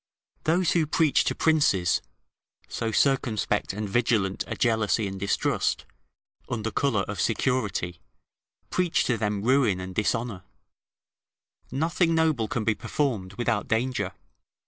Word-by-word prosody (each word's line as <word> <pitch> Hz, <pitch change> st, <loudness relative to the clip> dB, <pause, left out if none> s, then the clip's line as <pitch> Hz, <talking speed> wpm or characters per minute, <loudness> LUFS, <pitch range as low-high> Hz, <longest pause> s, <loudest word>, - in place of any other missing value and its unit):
Those 175 Hz, +2 st, +2 dB
who 165 Hz, -3 st, +2 dB
preach 155 Hz, -1 st, +3 dB
to -, -, 0 dB
princes 120 Hz, -, +2 dB, 0.7 s
so 115 Hz, -, -3 dB
circumspect 115 Hz, -5 st, +1 dB
and 105 Hz, +2 st, -4 dB
vigilant 105 Hz, -3 st, +1 dB
a -, -, -4 dB
jealousy 110 Hz, -3 st, +1 dB
and 95 Hz, 0 st, -6 dB
distrust, 100 Hz, +1 st, 0 dB, 0.6 s
under 110 Hz, -2 st, -2 dB
colour 125 Hz, -8 st, +1 dB
of 100 Hz, +1 st, -4 dB
security, 105 Hz, -8 st, -1 dB, 0.7 s
preach 180 Hz, -2 st, +1 dB
to 125 Hz, -, +1 dB
them 105 Hz, -2 st, -2 dB
ruin 120 Hz, -6 st, +3 dB
and 95 Hz, 0 st, -6 dB
dishonour: 105 Hz, 0 st, -1 dB, 1.3 s
nothing 165 Hz, +3 st, +1 dB
noble 155 Hz, -9 st, +2 dB
can 110 Hz, +1 st, -2 dB
be 110 Hz, -, +2 dB
performed 105 Hz, -7 st, -2 dB
without 120 Hz, -2 st, -1 dB
danger. 110 Hz, -4 st, -1 dB
115 Hz, 125 wpm, -26 LUFS, 100-135 Hz, 1.3 s, preach